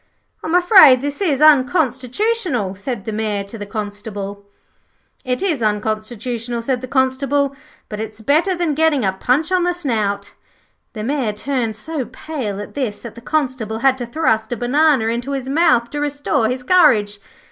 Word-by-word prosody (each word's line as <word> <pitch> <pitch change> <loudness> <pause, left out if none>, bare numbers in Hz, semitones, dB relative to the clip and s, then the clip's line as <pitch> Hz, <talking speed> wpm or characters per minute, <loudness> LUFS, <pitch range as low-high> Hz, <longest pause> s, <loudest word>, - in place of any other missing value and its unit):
'I'm 320 - -1
afraid 355 - +7
this 285 +6 -4
is 300 -8 +1
unconstitutional,' 270 - +2
said 200 +1 -6
the 220 - -3
Mayor 210 -2 -2
to 200 +3 -11
the 205 -2 -7
Constable. 205 -1 -6 0.8
'It 255 +7 -2
is 325 -10 0
unconstitutional,' 220 +2 -2
said 250 0 -1
the 255 - -6
Constable; 275 +2 0 0.3
'but 210 - -7
it's 215 0 -6
better 310 - +2
than 340 -3 -1
getting 295 -5 +2
a 190 - +1
punch 260 - 0
on 370 -1 +3
the 355 0 0
snout.' 215 -11 -2 0.6
The 215 - -5
Mayor 255 -3 -1
turned 235 0 -2
so 290 +4 -4
pale 250 -4 -5
at 205 - -8
this 245 -7 -3
that 235 - -9
the 235 - -12
Constable 255 -6 -2
had 265 -1 +5
to 245 - -4
thrust 235 -5 0
a 240 - -2
banana 270 +1 +2
into 235 +4 -2
his 265 -2 -4
mouth 270 -6 +2
to 295 - -4
restore 285 -6 0
his 250 0 -3
courage. 215 - +3
250 Hz, 170 wpm, -19 LUFS, 220-290 Hz, 0.8 s, afraid